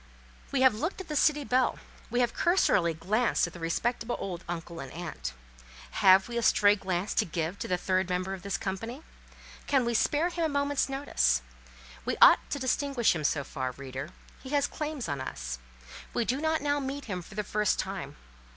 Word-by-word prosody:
We 275 Hz, -, +1 dB
have 260 Hz, -3 st, +6 dB
looked 315 Hz, -, -3 dB
at 380 Hz, -, -8 dB
the 300 Hz, -, -3 dB
city 295 Hz, 0 st, +3 dB
belle; 255 Hz, -1 st, +2 dB, 0.3 s
we 245 Hz, +2 st, +1 dB
have 240 Hz, -1 st, +1 dB
cursorily 200 Hz, -, +3 dB
glanced 210 Hz, +9 st, +1 dB
at 170 Hz, -, -8 dB
the 175 Hz, -, -9 dB
respectable 225 Hz, +8 st, -1 dB
old 180 Hz, -2 st, -5 dB
uncle 170 Hz, -1 st, -5 dB
and 135 Hz, -1 st, -7 dB
aunt. 170 Hz, -, -5 dB, 0.6 s
Have 190 Hz, -2 st, +6 dB
we 235 Hz, 0 st, -2 dB
a -, -, -1 dB
stray 205 Hz, -2 st, +5 dB
glance 190 Hz, -1 st, -2 dB
to -, -, +3 dB
give 165 Hz, +2 st, -3 dB
to -, -, -4 dB
the 180 Hz, -3 st, +1 dB
third 185 Hz, 0 st, 0 dB
member 185 Hz, +1 st, -1 dB
of 190 Hz, -, -7 dB
this 200 Hz, +1 st, -2 dB
company? 225 Hz, +9 st, -5 dB, 0.6 s
Can 270 Hz, -4 st, +3 dB
we 235 Hz, -, 0 dB
spare 295 Hz, +8 st, +2 dB
him 345 Hz, -1 st, -2 dB
a 320 Hz, -, +2 dB
moment's 285 Hz, -1 st, 0 dB
notice? 65 Hz, -, +1 dB, 0.6 s
We -, -, -2 dB
ought -, -, +9 dB
to -, -, -2 dB
distinguish 265 Hz, -2 st, +1 dB
him 155 Hz, -, -3 dB
so 145 Hz, 0 st, +1 dB
far, 130 Hz, -1 st, -4 dB
reader; 135 Hz, +2 st, -6 dB, 0.3 s
he 260 Hz, -, -9 dB
has 285 Hz, 0 st, +2 dB
claims 300 Hz, -3 st, -4 dB
on 140 Hz, -3 st, -3 dB
us; 65 Hz, -, -5 dB, 0.6 s
we 240 Hz, -, +1 dB
do 260 Hz, +5 st, -1 dB
not 315 Hz, -1 st, +1 dB
now 290 Hz, 0 st, +1 dB
meet 275 Hz, +1 st, -4 dB
him 185 Hz, -5 st, -4 dB
for 190 Hz, -, -13 dB
the 210 Hz, -, -1 dB
first 210 Hz, 0 st, +1 dB
time. 185 Hz, -7 st, -4 dB
210 Hz, 200 wpm, -29 LUFS, 170-275 Hz, 0.6 s, ought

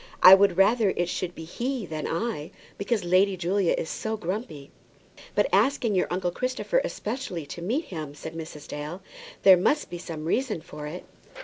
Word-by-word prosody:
"I 185 Hz, -, +12 dB
would 190 Hz, -2 st, +5 dB
rather 210 Hz, +2 st, +4 dB
it 175 Hz, 0 st, 0 dB
should 175 Hz, 0 st, -3 dB
be 160 Hz, -, -8 dB
he 240 Hz, +7 st, -3 dB
than 155 Hz, -3 st, -4 dB
I, 170 Hz, -4 st, -3 dB, 0.3 s
because 205 Hz, +1 st, 0 dB
Lady 185 Hz, +2 st, +3 dB
Julia 180 Hz, +1 st, +1 dB
is -, -, -3 dB
so 220 Hz, +5 st, -3 dB
grumpy." 180 Hz, -, -5 dB, 0.6 s
"But -, -, +3 dB
asking 265 Hz, -6 st, +3 dB
your 185 Hz, -, +2 dB
uncle 180 Hz, 0 st, -1 dB
Christopher 255 Hz, -, 0 dB
especially 215 Hz, -, -4 dB
to 170 Hz, -, -8 dB
meet 250 Hz, -, -1 dB
him!" 155 Hz, -, -7 dB
said 160 Hz, +2 st, -8 dB
Mrs. 160 Hz, -2 st, -8 dB
Dale. 150 Hz, +5 st, -6 dB, 0.4 s
"There 190 Hz, -2 st, +9 dB
must 290 Hz, -, +1 dB
be 175 Hz, -, -5 dB
some 160 Hz, -3 st, -6 dB
reason 220 Hz, 0 st, 0 dB
for 150 Hz, -2 st, -8 dB
it." 175 Hz, +4 st, -7 dB
185 Hz, 180 wpm, -26 LUFS, 165-220 Hz, 0.6 s, I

